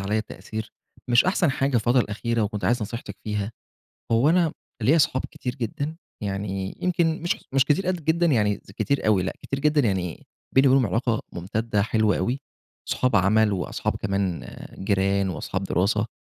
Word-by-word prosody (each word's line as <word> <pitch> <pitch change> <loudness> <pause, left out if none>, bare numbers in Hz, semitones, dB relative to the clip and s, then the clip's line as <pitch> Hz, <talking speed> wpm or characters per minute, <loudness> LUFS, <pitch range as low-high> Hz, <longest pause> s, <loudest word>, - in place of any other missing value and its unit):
عليَّ 105 +3 0
تأثير، 110 0 -7 0.4
مش 120 0 +5
أحسن 185 -3 +2
حاجة 135 0 0
الفترة 120 +3 +3
الأخيرة 115 +1 -1
وكنت 105 0 -2
عايز 120 -1 +2
نصيحتِك 105 -2 -6
فيها. 105 0 -2 0.6
هو 115 +6 +4
أنا 170 -2 +3 0.3
ليَّا 150 +9 +5
صحاب 130 -3 +2
كتير 125 -2 -5
جدًا، 140 +5 -3 0.3
يعني 95 -1 -3
يمكن 165 -3 +1
مش 170 - +1 0.2
مش 135 -1 +4
كتيرأد 175 +3 0
جدًا، 170 +2 +3
يعني 105 -8 +2
كتير 140 +8 -2
أوي 105 -4 +4
لأ، 95 - -2
كتير 135 - -3
جدًا 150 0 +3
يعني، 95 - -1 0.3
بيني 135 +1 +6
وبينهم 130 -1 +4
علاقة 115 +1 0
ممتدة 105 +4 -1
حلوة 110 -1 +2
أوي، 125 +9 -1 0.5
صحاب 125 -4 +2
عمَل 105 +3 +4
وأصحاب 90 -2 -2
كمان 100 -3 -2 0.3
جيران 100 0 +1
وأصحاب 95 +2 -3
دراسة. 100 +4 +1
110 Hz, 160 wpm, -25 LUFS, 100-135 Hz, 0.6 s, بيني